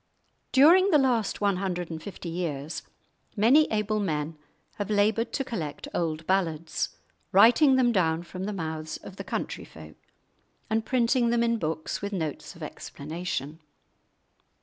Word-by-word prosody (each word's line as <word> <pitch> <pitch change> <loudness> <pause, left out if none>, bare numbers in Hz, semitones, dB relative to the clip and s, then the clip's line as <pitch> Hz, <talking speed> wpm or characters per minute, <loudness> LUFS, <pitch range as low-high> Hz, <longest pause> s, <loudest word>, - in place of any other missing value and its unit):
During 340 +8 +6
the 315 - +6
last 245 -8 +1
one 200 -2 +2
hundred 180 -3 -3
and 160 -1 -5
fifty 185 0 -8
years 165 -3 -3 0.5
many 245 +9 +5
able 215 0 0
men 155 -5 -2 0.4
have 205 -2 -3
laboured 215 +2 +2
to 270 - 0
collect 175 - -5
old 160 -2 -2
ballads, 165 -4 -1 0.3
writing 245 +8 +6
them 250 -2 +4
down 165 -5 +1
from 185 +2 -6
the 210 - -2
mouths 160 -4 -4
of - - -12
the - - -5
country - - -4
folk 80 -1 -13 0.7
and 220 0 0
printing 245 -1 +2
them 235 0 +2
in 230 -1 +1
books 155 -2 -3
with 200 +1 -4
notes 160 -6 -4
of - - -10
explanation. 155 -1 -5
195 Hz, 150 wpm, -27 LUFS, 160-230 Hz, 0.7 s, During